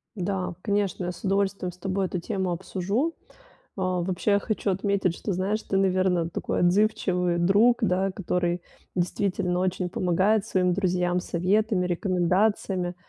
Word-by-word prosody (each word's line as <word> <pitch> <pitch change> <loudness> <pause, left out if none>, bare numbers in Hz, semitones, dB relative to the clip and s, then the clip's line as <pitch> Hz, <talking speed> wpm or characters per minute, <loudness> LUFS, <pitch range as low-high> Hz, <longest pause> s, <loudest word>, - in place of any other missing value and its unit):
Да, 185 -2 -2
конечно, 200 -3 -1
я 180 - -2
с - - -12
удовольствием 195 -2 0
с 180 - -18
тобой 190 +1 -1
эту 180 - -3
тему 185 +1 -2
обсужу. 195 - -1 0.6
А, 185 -1 0
вообще, 190 +3 +1
хочу 210 -1 -2
отметить, 190 -2 0
что, 200 - -3
знаешь, 200 +4 -1
ты, 195 - -1
наверно, 185 -3 +2
такой - - -2
отзывчивый 180 -2 +2
друг, 205 +7 +4
да, 190 -1 +1
который 180 -2 -1 0.3
действительно 180 0 0
очень 185 -1 -1
помогает 190 +4 +1
своим 180 -1 +1
друзьям 180 -2 +1
советами, 185 +3 +1
рекомендациями. 180 0 0
185 Hz, 140 wpm, -26 LUFS, 180-200 Hz, 0.6 s, друг